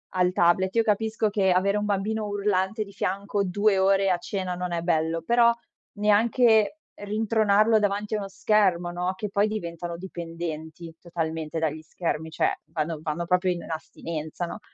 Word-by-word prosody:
al 180 -1 +3
tablet, 185 +2 +3
io 230 - +4
capisco 220 +1 +1
che 195 -2 +2
avere 195 +3 +2
un 210 - -1
bambino 210 +2 -1
urlante 205 0 0
di 200 - -13
fianco 200 +1 -1
2 205 +2 +2
ore 195 0 +3
a 180 - +2
cena 185 -1 -3
non 180 0 -4
è 170 - -1
bello, 165 -1 0
però 235 +4 +5 0.4
neanche 220 +3 +3 0.2
rintronarlo 215 +1 +2
davanti 205 +1 -1
a 215 - +1
uno 200 - -5
schermo, 195 -3 +2
no, 180 +1 -2
che 210 +2 -4
poi 200 +2 +2
diventano 170 -5 -5
dipendenti 165 -2 -7
totalmente 165 -2 -4
dagli 155 -1 -1
schermi, 160 -1 -3
cioè 160 - +1
vanno 160 0 -3
vanno 160 +2 -3
proprio 180 +1 +2
in 175 - -7
astinenza, 160 +1 -5
no, 170 - -7
190 Hz, 165 wpm, -26 LUFS, 170-210 Hz, 0.4 s, però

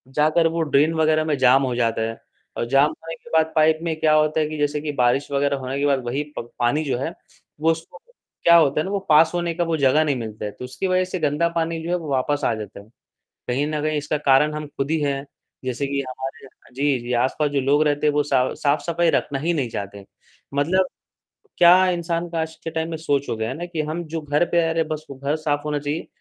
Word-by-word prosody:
जाकर 155 +3 +3
वो 165 0 -1
ड्रेन 155 +1 +2
वगैरह 155 -1 +2
में 150 -3 0
जाम 130 +1 +5
हो 125 -2 -1
जाता 115 -2 0
है। 115 0 -3 0.4
और - - -1
जाम 135 +1 +5
होने 165 +1 -9
के - - -17
बाद 160 0 +3
पाइप 155 0 +4
में 165 -2 -1
क्या 155 -1 +3
होता 155 +1 +3
है 155 - +1
कि 155 - -5
जैसे 145 0 0
कि 150 0 -3
बारिश 125 +1 +1
वगैरह 140 0 +1
होने 130 +1 -4
के 145 - +1
बाद 140 -2 +2
वही 135 +5 -1
प - - -1 0.2
पानी 120 +6 +1
जो 130 -4 -1
है, 150 +7 -3 0.5
वो 160 +2 +3
उसको 165 0 -6 0.5
क्या 170 - +7
होता 150 -3 +4
है - - -3
ना 190 - -4
वो 200 - 0
पास 155 +1 +6
होने 170 -1 -1
का 175 - 0
वो 165 -1 -1
जगह 140 +2 +4
नहीं 145 -3 0
मिलता 110 -3 -6
है, 105 - -4
तो 125 - -9
उसकी 160 +9 -4
वजह 185 0 +2
से 185 0 -4
गंदा 150 +2 +1
पानी 165 0 -1
जो 170 - -5
है 175 - +2
वो 160 -3 -7
वापस 145 +2 0
आ - - +2
जाता 105 -2 -8
है, 100 - -14 0.6
कहीं 130 +4 0
न 155 0 -2
कहीं 155 0 0
इसका 150 +1 -2
कारण 145 +1 +3
हम 150 0 -5
खुद 135 +2 -2
ही 160 - +2
हैं। 140 -1 -1 0.4
जैसे 130 +2 -2
कि 140 0 -2
हमारे 135 +2 -7 0.3
जी, 140 0 +1
जी, 120 +1 -5
आसपास 130 +5 +1
जो 140 -1 0
लोग 140 +3 +3
रहते 145 0 +1
हैं 150 - +3
वो 150 - +3
सा 130 -3 +1
साफ-सफाई 165 +3 +1
रखना 140 - -1
ही 165 +5 0
नहीं 135 -6 -1
चाहते। 100 -1 -6 0.5
मतलब 180 +6 +2 0.7
क्या 180 +2 +7
इंसान 170 -1 -2
का 165 - -3
आज 160 0 -5
के - - -3
टाइम 160 0 -2
में 160 - -3
सोच 145 -3 -1
हो - - -1
गया 110 0 -2
है 130 - -4
ना 175 - -4
कि 170 -3 -3
हम 170 +2 -3
जो 165 - -2
घर 150 +2 +1
पे 170 - -1
रह 165 - 0
रहे 165 0 +1
है, - - -12
बस 155 0 -5
वो 140 - -7
घर 140 +3 -1
साफ 145 -2 -1
होना 150 -1 -1
चाहिए, 145 +3 -4
150 Hz, 260 wpm, -22 LUFS, 135-160 Hz, 0.7 s, क्या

